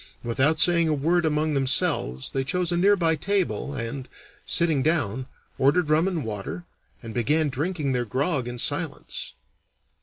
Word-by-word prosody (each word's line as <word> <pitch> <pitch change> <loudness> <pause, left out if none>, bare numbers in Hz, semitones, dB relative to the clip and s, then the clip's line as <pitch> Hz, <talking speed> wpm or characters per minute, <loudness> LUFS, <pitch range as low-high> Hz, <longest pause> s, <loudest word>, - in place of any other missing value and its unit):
Without 135 +7 +1
saying 170 -1 +5
a 155 - +1
word 165 +4 +1
among 155 0 0
themselves 130 - 0
they 135 - -1
chose 180 +5 -1
a - - +1
near 195 +4 +4
by 165 -4 +1
table 185 -4 -1
and, 130 +2 -5 0.4
sitting 160 -5 +3
down, 130 -6 0 0.3
ordered 150 +4 +2
rum 160 +4 +3
and 170 -8 -2
water, 110 - -6 0.4
and 115 -1 -7
began 150 +7 +1
drinking 150 +1 -2
their 125 -1 0
grog 130 - -1
in 120 0 -5
silence. - - -2
150 Hz, 155 wpm, -25 LUFS, 130-170 Hz, 0.4 s, saying